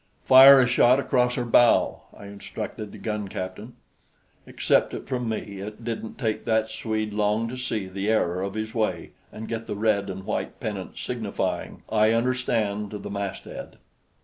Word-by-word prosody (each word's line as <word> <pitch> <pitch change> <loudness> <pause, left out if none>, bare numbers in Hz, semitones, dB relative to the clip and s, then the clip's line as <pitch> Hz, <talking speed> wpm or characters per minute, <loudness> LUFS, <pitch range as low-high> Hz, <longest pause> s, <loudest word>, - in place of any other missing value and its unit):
"Fire 135 +1 +9
a 130 - +5
shot 125 +1 +4
across 125 -2 +1
her 120 - -2
bow," 120 0 +4 0.2
I - - -11
instructed 100 +1 -7
the - - -10
gun 105 -2 -3
captain. 95 +6 -7 0.7
Accept - - +1
it - - -8
from 125 -3 -2
me, 100 -3 -5
it 105 +3 -8
didn't 115 -1 -5
take 110 -4 -2
that 110 -1 +1
Swede 110 -1 -3
long 105 +2 +1
to 125 - -6
see 125 -5 -3
the 95 +2 -3
error 90 -5 +1
of 100 +1 -4
his 110 0 -4
way 100 -7 -2 0.2
and 110 +1 -8
get 115 0 -5
the 105 - -3
red 100 -1 +1
and 95 0 -6
white - - -3
pennant 100 -3 -5
signifying 100 -6 -4
"I 110 0 +3
understand" 115 -4 0
to 105 - -6
the 100 - -8
masthead. 100 -2 -6
110 Hz, 175 wpm, -25 LUFS, 100-115 Hz, 0.7 s, Fire